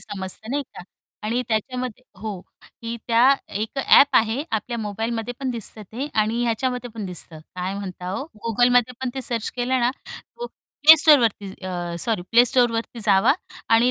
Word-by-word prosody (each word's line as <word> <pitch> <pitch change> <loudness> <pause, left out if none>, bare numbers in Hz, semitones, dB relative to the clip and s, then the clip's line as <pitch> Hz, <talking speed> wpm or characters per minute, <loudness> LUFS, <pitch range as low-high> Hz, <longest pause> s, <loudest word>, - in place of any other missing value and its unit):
समजतं, 205 +1 -6
नाही 285 +2 0
का? - - -9 0.4
आणि 240 +3 0
त्याच्यामध्ये 250 +2 -3 0.2
हो, 210 -3 -4 0.4
ही 230 0 -4
त्या 230 0 +3 0.4
एक 220 +5 -4
ॲप 275 0 +6
आहे 225 +5 +2
आपल्या 235 +2 -2
मोबाईलमध्ये 225 +3 -3
पण 265 -2 -1
दिसतं 225 -2 -5
ते 265 +5 -3
आणि 225 +3 0
ह्याच्यामध्ये 245 +1 -1
पण 215 -4 -5
दिसतं. 170 -2 -6 0.2
काय 185 +1 -3
म्हणता 185 -2 -6
ओ? 275 - -3 0.2
Googleमध्ये 245 +2 +3
पण 260 -1 -2
ते 265 - -3
सर्च 230 -2 -2
केलं 255 +1 0
ना, 240 +1 +3
तो 475 - -10 0.4
Play 320 - +13
Storeवरती 230 -10 +4 0.2
अ, 175 -2 -4
सॉरी 215 +1 -1
Play 240 - +8
Storeवरती 235 -1 +1
जावा 195 +1 +5 0.4
आणि 235 +2 +4
230 Hz, 165 wpm, -23 LUFS, 210-250 Hz, 0.4 s, Play